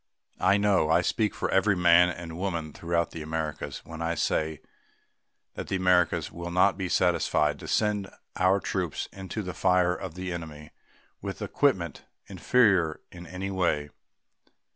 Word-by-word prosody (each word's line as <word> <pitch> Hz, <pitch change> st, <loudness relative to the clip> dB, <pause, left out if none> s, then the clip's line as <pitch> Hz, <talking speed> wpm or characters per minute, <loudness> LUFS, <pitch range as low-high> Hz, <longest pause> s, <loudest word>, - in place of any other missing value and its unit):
I 95 Hz, +2 st, +4 dB
know 100 Hz, -6 st, +2 dB
I 85 Hz, +2 st, +4 dB
speak 105 Hz, +4 st, 0 dB
for -, -, -2 dB
every 95 Hz, +1 st, +3 dB
man 90 Hz, 0 st, +5 dB
and 85 Hz, -1 st, -7 dB
woman 85 Hz, -4 st, -3 dB
throughout 85 Hz, 0 st, -1 dB
the 80 Hz, -, -7 dB
Americas 75 Hz, -3 st, -4 dB
when 80 Hz, 0 st, -8 dB
I 85 Hz, 0 st, -1 dB
say 80 Hz, -1 st, -1 dB, 0.9 s
that -, -, -7 dB
we 95 Hz, -, 0 dB
Americans 90 Hz, -2 st, +2 dB
will 85 Hz, 0 st, -6 dB
not 90 Hz, +2 st, +3 dB
be 95 Hz, -2 st, -4 dB
satisfied 80 Hz, -5 st, +1 dB
to -, -, -9 dB
send 105 Hz, -3 st, 0 dB, 0.3 s
our 95 Hz, +2 st, +3 dB
troops 90 Hz, -5 st, -3 dB
into 95 Hz, +3 st, -5 dB
the 90 Hz, -1 st, -5 dB
fire 90 Hz, 0 st, +2 dB
of 90 Hz, -2 st, -7 dB
the 90 Hz, -1 st, -4 dB
enemy 75 Hz, -3 st, -8 dB, 0.5 s
with -, -, -5 dB
equipment 95 Hz, -, 0 dB, 0.2 s
inferior 95 Hz, -10 st, +2 dB
in 85 Hz, 0 st, -11 dB
any 95 Hz, +3 st, -5 dB
way. 75 Hz, -6 st, 0 dB
90 Hz, 155 wpm, -27 LUFS, 80-95 Hz, 0.9 s, man